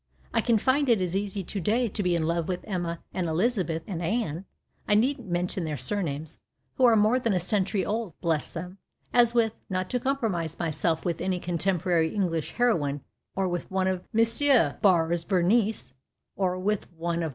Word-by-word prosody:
I - - +3
can 235 -2 +3
find 265 +5 +2
it 230 -4 +4
as 180 -1 -1
easy 200 0 -2
to 200 - -4
day 225 +7 +1
to 210 0 -3
be 180 -2 +1
in 165 - 0
love 165 0 0
with 180 -1 -2
Emma 175 -4 -3
and 180 -2 -1
Elizabeth 170 -2 0
and 175 -4 -4
Anne 185 -2 -2 0.2
— - - -39
I 210 - +5
needn't 240 -1 +1
mention 175 +1 -1
their 155 -2 -3
surnames 155 - -3 0.2
— - - -47
who 260 - +5
are 235 -2 +6
more 220 +4 +4
than 230 -4 0
a 185 - +2
century 190 +1 0
old, 215 -5 -3
bless 165 -3 -1
them, 180 +3 -7 0.3
as 240 -1 +4
with 225 -2 +3 0.2
(not 185 -1 -2
to 250 - +1
compromise 220 - -1
myself 160 0 -1
with 170 -2 -1
any 185 0 0
contemporary 175 -1 +1
Englisli 165 -5 0
heroine) 150 - +1 0.4
M. 190 - +1
Barres's 170 -3 +3
Berenice, 200 - +1 0.4
or 185 -2 0
with 200 +1 -2
one 170 +1 -2
of - - 0
M. - - -2
185 Hz, 185 wpm, -27 LUFS, 170-215 Hz, 0.4 s, are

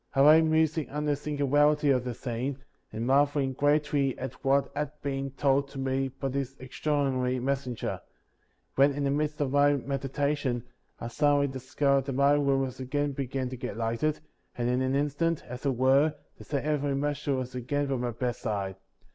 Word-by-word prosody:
44. 140 +2 +7
I - - +9
lay - - +5
musing 160 -1 +1
on 150 +1 -3
the 145 -1 +2
singularity 145 0 +2
of 130 -2 +2
the 125 -2 -4
scene, 125 +2 -3 0.3
and 110 +2 -4
marveling 140 0 +2
greatly 145 -1 +1
at 130 - -5
what 135 +1 +2
had 150 +1 -2
been 135 -1 -2
told 135 +1 +1
to 140 - -11
me 135 0 0
by 135 +1 -5
this 135 0 -3
extraordinary 130 -1 -1
messenger; 130 -2 -2 0.7
when, 140 +1 +4
in 145 +1 -2
the 140 - +1
midst 150 +1 -1
of 135 -3 0
my 145 +1 +4
meditation, 135 -1 -1 0.4
I - - -5
suddenly 145 +3 +3
discovered 135 +1 0
that 135 - -3
my 140 +2 +4
room 140 -2 +3
was 130 -1 -4
again 145 +3 -1
beginning 130 -1 -3
to 130 - -5
get 125 -4 -5
lighted, 115 +7 -1 0.4
and 120 -1 0
in 125 +1 +1
an 130 +1 0
instant, 150 +3 0
as 125 +3 -5
it 135 - +1
were, 135 +5 +3 0.2
the - - -13
same 140 -2 -2
heavenly 145 -2 0
messenger 145 0 -1
was 130 0 -4
again 135 +4 -1
by 135 -1 -1
my 120 0 -2
bedside. 110 -5 -3
135 Hz, 185 wpm, -28 LUFS, 130-145 Hz, 0.7 s, I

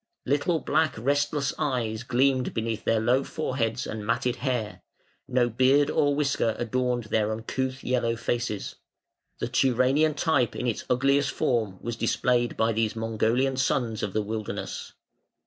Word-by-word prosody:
Little 145 +5 +1
black 155 0 +1
restless 145 +4 0
eyes 115 -5 -1
gleamed 130 +1 +1
beneath 115 -1 -2
their 115 - +3
low 125 +5 +2
foreheads 125 -7 -2
and 110 -1 -5
matted 120 +3 0
hair; 125 -6 -2 0.5
no 125 -2 +2
beard 130 +5 +3
or 145 -1 +2
whisker 140 -6 +1
adorned 125 +1 -1
their 110 0 0
uncouth 130 +4 -3
yellow 120 -2 0
faces; 115 -2 -3 0.6
the - - -2
Turanian 135 +4 +2
type 140 -6 +1
in - - -3
its 120 -3 -2
ugliest 140 +3 +3
form 110 -10 0
was 120 -1 -4
displayed 120 +1 +1
by 110 +1 +2
these 110 0 0
Mongolian 115 +4 0
sons 120 -4 0
of 100 - -3
the 110 - 0
wilderness. 110 0 -5
125 Hz, 145 wpm, -26 LUFS, 115-135 Hz, 0.6 s, their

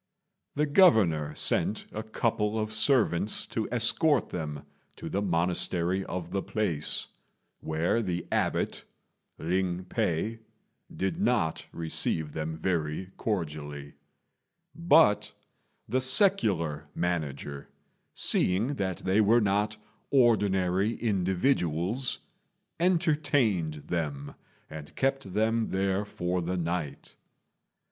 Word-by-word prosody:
The 150 - +2
Governor 100 - +4
sent 105 - +2
a 110 - -4
couple 110 -1 -1
of 110 0 -3
servants 110 -4 +3
to 110 -2 -4
escort 125 +4 +2
them 75 -4 -5 0.3
to - - -7
the 100 - -1
monastery 90 0 0
of 90 -1 -5
the 95 0 -1
place, 95 -10 -1 0.5
where 80 +8 0
the 90 -5 -3
abbot, - - -1 0.5
Ling 90 +1 -1
p'ei, 110 +2 -2 0.5
did 95 - -3
not 100 - 0
receive 80 -2 0
them 80 0 -4
very 85 +1 -2
cordially; 75 -8 -4 0.8
but 160 -8 +3 0.5
the 130 +4 0
secular 105 - +3
manager, 75 -5 -3 0.5
seeing 105 +10 +2
that 95 -4 -3
they 95 +3 +3
were 110 +3 +4
not 105 +1 0 0.3
ordinary 105 -5 +2
individuals, 95 - 0 0.6
entertained 145 - +1
them 75 -5 -3 0.3
and 80 -2 -10
kept 135 -8 -1
them 110 +1 +1
there 95 +1 0
for 90 -2 -2
the 90 +2 -2
night. 85 -4 -4
95 Hz, 100 wpm, -28 LUFS, 85-115 Hz, 0.8 s, Governor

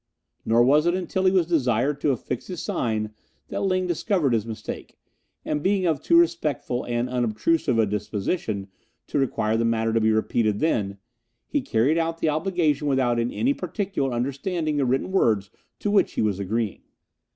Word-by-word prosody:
Nor 115 +2 +5
was 150 +6 +4
it 175 - +3
until 185 +1 -2
he 185 - +5
was 185 -3 +3
desired 140 -3 +1
to - - +2
affix 125 -1 -3
his 180 -3 -5
sign 110 -6 -2 0.4
that - - -3
Ling 185 -1 +1
discovered 175 - +1
his 115 -1 0
mistake, 110 -1 -7 0.5
and 150 -1 -1
being 190 +2 +1
of 160 -5 +1
too 335 - +4
respectful 150 - +1
and 120 0 -1
unobtrusive 125 +3 +1
a 110 - +4
disposition 105 - -2 0.4
to 145 - -1
require 110 -5 0
the 115 - +1
matter 115 -1 +1
to 115 - +2
be 110 0 +3
repeated 110 -1 +1
then, 100 -11 0 0.5
he 290 - -1
carried 135 - +2
out 165 0 -1
the 160 - +1
obligation 155 -2 0
without 130 -4 +2
in 120 +1 0
any 270 +4 +1
particular 195 - -2
understanding 145 +6 -2
the 140 - +2
written 130 +8 0
words 110 - +2 0.3
to 205 - -2
which 205 - +3
he - - -1
was 100 -3 0
agreeing. 105 +1 -2
135 Hz, 175 wpm, -24 LUFS, 115-165 Hz, 0.5 s, Nor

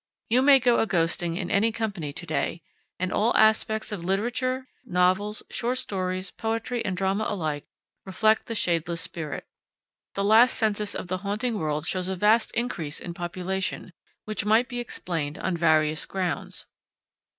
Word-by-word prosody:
You 245 +3 +4
may 275 0 +7
go 245 -1 +3
a 225 - +2
ghosting 170 -1 0
in 180 -3 -3
any 220 +3 +3
company 205 -10 -3
to 170 - -7
day, 165 +1 -2 0.3
and 185 0 -2
all 230 +3 +2
aspects 220 0 +3
of 195 -5 -4
literature, 250 +7 -1 0.2
novels, 190 0 +1
short 245 +2 -1
stories, 185 -5 -3
poetry, 230 +1 -2
and 185 -2 -2
drama 195 +3 0
alike, 155 -7 -2 0.4
reflect 215 +3 +2
the 230 - -3
shadeless 170 -3 0
spirit. 155 -4 -5 0.7
The 200 - 0
latest 225 +5 +6
census 210 -2 0
of - - -4
the 185 +1 -2
haunting 210 +3 -1
world 155 -1 -1
shows 185 +1 -1
a 190 - -1
vast 215 +5 +4
increase 165 -11 -2
in 175 - -6
population, 185 +2 -3 0.3
which 215 0 -2
might 220 +4 +4
be 245 -1 -4
explained 165 -10 -3
on 190 - -1
various 155 -2 +2
grounds. 185 -3 -2
195 Hz, 160 wpm, -26 LUFS, 175-220 Hz, 0.7 s, may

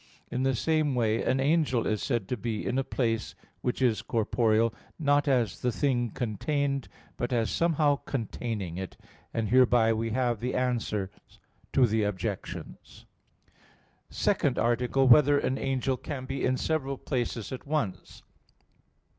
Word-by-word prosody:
In 125 - -1
the 135 0 +2
same 155 0 +1
way 115 -2 +1
an 130 - +1
angel 140 -4 +2
is 110 -1 0
said 120 -7 -1
to 125 - 0
be 110 -1 -3
in 130 - 0
a - - +1
place 115 -4 -1 0.3
which 125 +1 -1
is 115 -4 +2
corporeal, 115 0 +1 0.2
not 145 -2 +2
as 120 -7 +1
the 125 - +1
thing 120 -3 0
contained, 140 +5 -2 0.3
but 120 - -2
as 115 -4 +1
somehow 155 -4 +2
containing 110 - -4
it. 95 0 -6 0.3
And 110 -2 -2
hereby 120 -2 +5
we 115 +1 -2
have 120 -1 0
the 125 +3 -2
answers 115 -6 -1 0.6
to 130 - +5
the 110 -1 +1
objections. 105 -3 -5 0.4
_______________________ - - -36 0.6
SECOND - - +1
ARTICLE 120 +3 +2
[I, - - +4
Q. - - +4
52, - - +14
Art. 150 - +6
2] - - +4
Whether - - 0
an 130 - -1
Angel 135 -1 0
Can 130 0 -6
Be 135 +1 -4
in 130 0 +2
Several 140 -3 -1
Places 120 -5 -3
at 130 +1 -7
Once? 110 - -3
125 Hz, 165 wpm, -28 LUFS, 115-135 Hz, 0.6 s, 52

